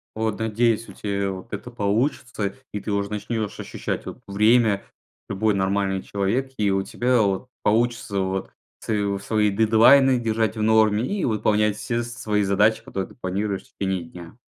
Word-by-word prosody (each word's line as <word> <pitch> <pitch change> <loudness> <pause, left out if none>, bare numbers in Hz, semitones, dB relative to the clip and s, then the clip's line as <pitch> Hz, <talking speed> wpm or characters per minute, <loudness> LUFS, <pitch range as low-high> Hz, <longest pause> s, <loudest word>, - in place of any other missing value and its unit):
Вот, 110 -1 -2
надеюсь, 110 +1 +1
у - - -10
тебя 100 -1 -2
вот 95 +1 -9
это 115 +4 -6
получится, 110 -1 -1 0.2
и 105 - -3
ты 105 - -4
уже 100 0 -1
начнёшь 105 0 -3
ощущать - - -4
вот - - -8
время 105 +1 +3 0.5
любой 110 +2 +1
нормальный 95 0 0
человек, 110 +7 -1
и 105 -2 +2
у 95 0 +1
тебя 125 +3 +1
вот 100 +3 0 0.2
получится 115 -2 +1
вот 95 0 -2 0.3
св 100 -2 -1
свои 105 0 +2
дедлайны 120 +5 +5
держать 110 -1 0
в - - -2
норме 110 0 +4
и 200 +3 -2
выполнять 105 -2 +1
все 120 +2 -2
свои 115 -3 -1
задачи, 105 +3 +2
которые 95 -1 -4
ты - - -16
планируешь 100 -1 -2
в 130 - -27
течение 95 -2 -1
дня. 85 +5 -12
105 Hz, 165 wpm, -23 LUFS, 100-115 Hz, 0.5 s, дедлайны